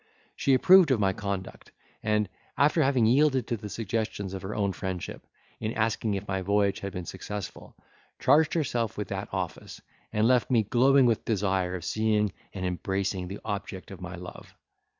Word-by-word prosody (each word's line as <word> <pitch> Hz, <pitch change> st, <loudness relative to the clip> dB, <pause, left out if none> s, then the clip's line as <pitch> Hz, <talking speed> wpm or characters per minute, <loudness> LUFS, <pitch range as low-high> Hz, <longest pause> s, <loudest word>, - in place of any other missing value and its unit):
She 135 Hz, -, +3 dB
approved 185 Hz, +4 st, +7 dB
of 130 Hz, -4 st, +3 dB
my 95 Hz, -2 st, +2 dB
conduct, 100 Hz, -1 st, -5 dB, 0.3 s
and, 105 Hz, -1 st, +1 dB, 0.3 s
after 150 Hz, +3 st, +4 dB
having 135 Hz, -5 st, +3 dB
yielded 130 Hz, +1 st, +3 dB
to 120 Hz, -, -1 dB
the 105 Hz, -1 st, -7 dB
suggestions 105 Hz, -2 st, -3 dB
of 95 Hz, -, -5 dB
her 100 Hz, +2 st, -5 dB
own 100 Hz, -2 st, 0 dB
friendship, 95 Hz, -2 st, -5 dB, 0.3 s
in 110 Hz, +1 st, -2 dB
asking 110 Hz, -1 st, 0 dB
if 100 Hz, +1 st, -5 dB
my 95 Hz, -1 st, -1 dB
voyage 100 Hz, +1 st, +1 dB
had 100 Hz, -, -5 dB
been 90 Hz, -3 st, -5 dB
successful, 95 Hz, +2 st, -7 dB, 0.4 s
charged 155 Hz, +5 st, +4 dB
herself 120 Hz, -8 st, -1 dB
with -, -, -4 dB
that -, -, -4 dB
office, -, -, -5 dB, 0.3 s
and 110 Hz, +1 st, +2 dB
left 125 Hz, -2 st, +3 dB
me 120 Hz, -4 st, +4 dB
glowing 130 Hz, +5 st, +4 dB
with 115 Hz, -3 st, +2 dB
desire 95 Hz, -4 st, 0 dB
of 90 Hz, -2 st, -6 dB
seeing 105 Hz, 0 st, +1 dB, 0.2 s
and 95 Hz, -2 st, -4 dB
embracing 95 Hz, +1 st, -2 dB
the 100 Hz, +3 st, -7 dB
object 100 Hz, -3 st, -5 dB
of 95 Hz, -, -10 dB
my 90 Hz, 0 st, -6 dB
love. 90 Hz, +1 st, -10 dB
105 Hz, 175 wpm, -28 LUFS, 95-120 Hz, 0.4 s, approved